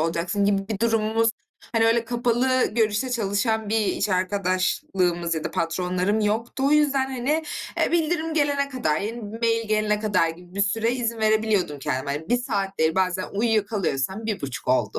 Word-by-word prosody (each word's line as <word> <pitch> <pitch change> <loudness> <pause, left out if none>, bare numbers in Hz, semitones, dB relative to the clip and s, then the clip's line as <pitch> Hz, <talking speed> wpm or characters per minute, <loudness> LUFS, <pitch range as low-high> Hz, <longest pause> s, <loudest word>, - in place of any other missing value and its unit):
olacaksın 170 +4 0
gibi 195 -1 +1
bir 215 -3 -3
durumumuz, 225 0 +2 0.4
hani, 225 -1 +3
öyle 230 0 +3
kapalı 245 +2 +1
görüşte 220 +2 +1
çalışan 220 -1 0
bir 220 +1 +2
iş 210 - 0
arkadaşlığımız 185 -2 0
ya 160 - -4
da - - -2
patronlarım 180 +5 0
yoktu. 225 +5 -1
O 280 - +2
yüzden, 285 -3 +3
hani, 270 +5 -1 0.4
eee, - - +1
bildirim 325 -1 0
gelene 285 -2 +1
kadar, 200 - -1
yeni 220 +4 -4 0.2
bir 225 - -6
mail 230 -1 +1
gelene 215 -1 +1
kadar 205 -6 +2
gibi 175 +2 -10
bir 200 - -1
süre 225 +3 +1
izin 235 -2 -2
verebiliyordum 215 -8 +1
kendime, 130 +1 -2
hani, 155 +4 -5
1 245 - +3
saat 200 -6 -2
değil 160 0 +2
bazen 185 0 +1
uyuyakalıyorsam 210 - 0
1,5 140 - -4
olduğu 130 - +1
215 Hz, 170 wpm, -24 LUFS, 185-235 Hz, 0.4 s, hani